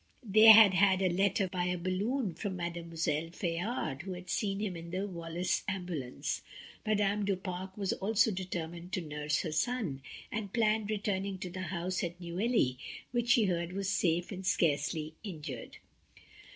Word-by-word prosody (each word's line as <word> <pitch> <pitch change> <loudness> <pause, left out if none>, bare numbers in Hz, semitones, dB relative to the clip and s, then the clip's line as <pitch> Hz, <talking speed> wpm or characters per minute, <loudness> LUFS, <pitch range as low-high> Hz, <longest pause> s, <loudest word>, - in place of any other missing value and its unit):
They 215 +2 +7
had 220 -3 +10
had 190 0 +4
a 185 -2 +2
letter 195 +1 +2
by 180 -1 -2
a 180 0 0
balloon 190 +5 -1
from 190 +3 -4
Mademoiselle 165 -2 -2
Fayard, 175 - -2
who 190 +2 -5
had 180 0 -7
seen 195 -2 0
him 205 -4 -2
in 170 0 -8
the 185 +3 -2
Wallace 170 -1 -2
ambulance. 175 -10 -3 0.4
Madame 210 -1 +1
du 200 -1 +1
Pare 185 0 -5
also 195 -2 -1
was 215 +2 +4
determined 175 -1 -5
to 185 - 0
nurse 150 -1 -1
her 160 - -3
son, 170 - -1 0.3
and 210 -2 -3
planned 215 -2 +2
returning 200 -2 -1
to 180 -1 -6
the 185 +1 -5
house 180 +1 -2
at 175 0 -4
Neuilly, 175 - 0 0.3
which 240 -1 -1
she 235 -4 +5
heard 170 -2 -1
was 195 0 -2
safe 175 -2 +1
and 190 -1 -6
scarcely 155 -2 +1
injured. 150 - -7
185 Hz, 165 wpm, -32 LUFS, 170-200 Hz, 0.4 s, had